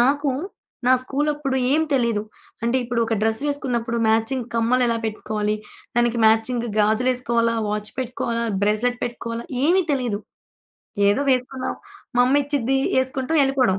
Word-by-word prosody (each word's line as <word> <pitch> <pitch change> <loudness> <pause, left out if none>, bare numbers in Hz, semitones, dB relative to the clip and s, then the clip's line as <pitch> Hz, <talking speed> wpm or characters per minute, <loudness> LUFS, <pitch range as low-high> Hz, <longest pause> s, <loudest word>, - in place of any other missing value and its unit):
నాకు 280 +3 +3 0.6
నా 255 - +6
స్కూలప్పుడు 290 0 -1
ఏమి 315 +2 +2
తెలియదు. 235 -5 +1 0.4
అంటే 235 +3 +1
ఇప్పుడు 235 0 -1
ఒక 225 0 0
డ్రెస్ 220 +2 +1
వేసుకున్నప్పుడు 250 -5 -1
మ్యాచింగ్ 225 +3 +1
కమ్మలెలా 235 +1 +2
పెట్టుకోవాలి, 215 -1 -2 0.4
దానికి 240 0 +2
మ్యాచింగ్ 230 +2 +2
గాజులేసుకోవాలా, 230 +1 +2
వాచ్ 210 0 -3
పెట్టుకోవాలా, 235 -2 -2 0.2
బ్రేస్‌లెట్ 230 +4 +1
పెట్టుకోవాలా, 235 -1 -5 0.2
ఏమి 365 +5 +4
తెలీదు. 245 -7 0 0.9
ఏదో 205 +8 +2
వేసుకున్నాం. 255 +1 -1 0.4
మా 245 - +6
అమ్మ 285 +3 +4
ఇచ్చింది 270 -2 0 0.2
వేసుకుంటాం 260 +4 +1
ఎళ్ళిపోడం. 255 -8 +2
245 Hz, 125 wpm, -22 LUFS, 230-265 Hz, 0.9 s, నా